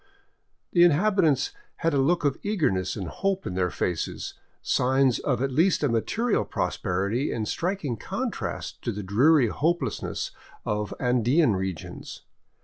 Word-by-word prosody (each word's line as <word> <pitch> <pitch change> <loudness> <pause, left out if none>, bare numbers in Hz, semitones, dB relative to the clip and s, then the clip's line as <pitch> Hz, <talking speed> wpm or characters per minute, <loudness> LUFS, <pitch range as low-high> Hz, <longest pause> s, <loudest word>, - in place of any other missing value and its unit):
The 175 - +5
inhabitants 175 - +3 0.2
had 165 -2 0
a 140 - +2
look 155 +4 +2
of 140 -2 +1
eagerness 145 - 0
and 95 -4 -4
hope 195 - -2
in 100 - -3
their 90 -1 +1
faces, 85 +1 -3 0.3
signs 130 0 +2
of 125 -3 0
at 135 - 0
least 165 +5 +2
a 145 - +3
material 210 - +1
prosperity 100 +10 -1
in 110 - -2
striking 165 - -2
contrast - - -4
to - - -2
the 105 +1 -5
dreary 125 - +4
hope 170 +9 +1
lessness - - -3 0.3
of 105 0 -2
Andean 125 - +3
regions. 95 -3 -5
135 Hz, 140 wpm, -26 LUFS, 105-165 Hz, 0.3 s, The